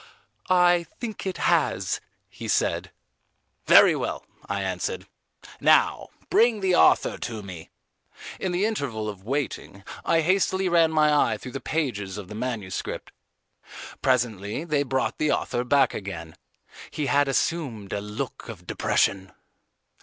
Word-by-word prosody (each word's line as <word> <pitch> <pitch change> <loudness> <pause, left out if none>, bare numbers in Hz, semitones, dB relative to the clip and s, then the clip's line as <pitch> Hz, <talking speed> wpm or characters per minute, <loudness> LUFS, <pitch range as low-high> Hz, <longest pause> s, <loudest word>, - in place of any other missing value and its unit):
"I 175 -2 +4
think 220 -4 -5
it 190 - -3
has," - - +1 0.3
he - - -9
said. - - 0 0.8
"Very - - +8
well," - - -4 0.2
I - - -1
answered; - - -3 0.5
"now - - +3 0.2
bring 230 -2 +4
the 190 -1 +2
author - - +4
to 110 -3 -5
me." 90 -5 -9 0.7
In 190 - -2
the 180 +3 +1
interval 135 - -2
of 100 -3 -7
waiting, 125 -5 -4 0.2
I 165 - +3
hastily 190 +2 +1
ran 165 -2 +4
my 155 -1 +3 0.2
eye - - -4
through 125 - -9
the 135 - -5
pages 105 -12 -2
of 100 -3 -8
the - - -7
manuscript. 110 -4 -4 0.9
Presently 115 -2 0
they 150 -4 0
brought 130 -1 -1
the 155 -1 +2
author 120 - -1
back 140 +3 +3
again. 85 -5 -7 0.5
He 150 - -3
had 140 +2 +3
assumed 135 - -1
a 100 - -2
look 105 +5 -6
of 95 -6 -9
depression. 95 +1 0
130 Hz, 140 wpm, -25 LUFS, 105-165 Hz, 0.9 s, Very